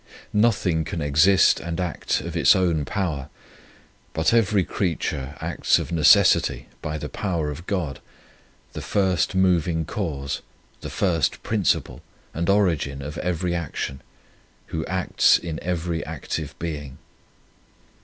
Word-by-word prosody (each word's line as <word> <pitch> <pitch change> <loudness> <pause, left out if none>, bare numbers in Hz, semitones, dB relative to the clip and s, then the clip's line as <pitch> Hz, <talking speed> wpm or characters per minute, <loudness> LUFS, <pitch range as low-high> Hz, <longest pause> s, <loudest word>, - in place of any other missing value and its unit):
N 105 - +3
othing 90 -8 +2
can 80 - -4
exist 75 +6 +4
and 85 +1 -5
act 90 -3 -1
of - - -6
its - - +5
own 85 -5 +1
power, 80 -6 -3 0.8
but 80 +7 +1
every 105 -4 +3
creature 75 -7 -2
acts - - +1
of - - -4
necessity 80 -4 +4 0.2
by 75 -1 -3
the 75 - -5
power 80 0 -2
of 85 +5 -9
God, 85 -9 -2 0.7
the - - -5
first 95 -1 +1
moving 90 -3 +2
cause, 75 -8 -3 0.4
the - - -7
first 85 -5 0
principle 105 -5 0 0.3
and 85 +2 -2
origin 80 -9 +1
of 75 +3 -6
every 90 0 -1
action, 75 -5 -4 0.7
Who 80 -1 -1
acts 95 -1 +3
in 80 -2 -5
every 85 -1 -2
active 80 -1 -5
being. 75 -5 -5
85 Hz, 130 wpm, -24 LUFS, 75-90 Hz, 0.8 s, its